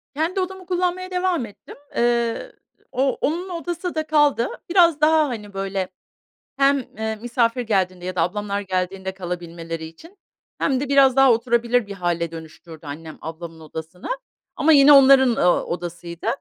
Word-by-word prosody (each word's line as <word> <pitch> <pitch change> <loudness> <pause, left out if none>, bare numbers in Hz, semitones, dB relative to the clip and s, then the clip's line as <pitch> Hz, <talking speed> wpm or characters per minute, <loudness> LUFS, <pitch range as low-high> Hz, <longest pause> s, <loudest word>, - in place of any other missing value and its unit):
Kendi 330 +6 -1
odamı 375 0 -4
kullanmaya 365 0 -1
devam 360 -7 0
ettim. 205 - -13 0.2
Eee, 235 - 0 0.4
o 265 +1 0
onun 345 +6 -1
odası 350 0 -4
da 310 0 -2
kaldı. 295 -5 +3 0.2
Biraz 340 -4 +4
daha, 310 -1 +4
hani, 210 -4 -7
böyle, 195 -1 -3 0.7
hem, 280 +1 +4 0.2
eee, 220 0 -2
misafir 235 +1 0
geldiğinde 185 -5 -1
ya 185 0 -5
da 165 - +2
ablamlar 200 +3 -2
geldiğinde 190 0 -3
kalabilmeleri 170 -3 -6
için 325 - -13 0.4
hem 265 -2 +1
de 285 - -3
biraz 275 -2 +5
daha 270 -2 +6
oturabilir 235 0 +1
bir 200 - -7
hâle 175 -3 -2
dönüştürdü 160 -1 -11
annem 155 +2 -8
ablamın 165 0 -8
odasını 160 +3 -8 0.5
ama 320 - +4
yine 285 0 +8
onların, 270 -1 +7
ııı, 175 0 +3
odasıydı. 170 -1 -6
230 Hz, 150 wpm, -22 LUFS, 180-295 Hz, 0.7 s, yine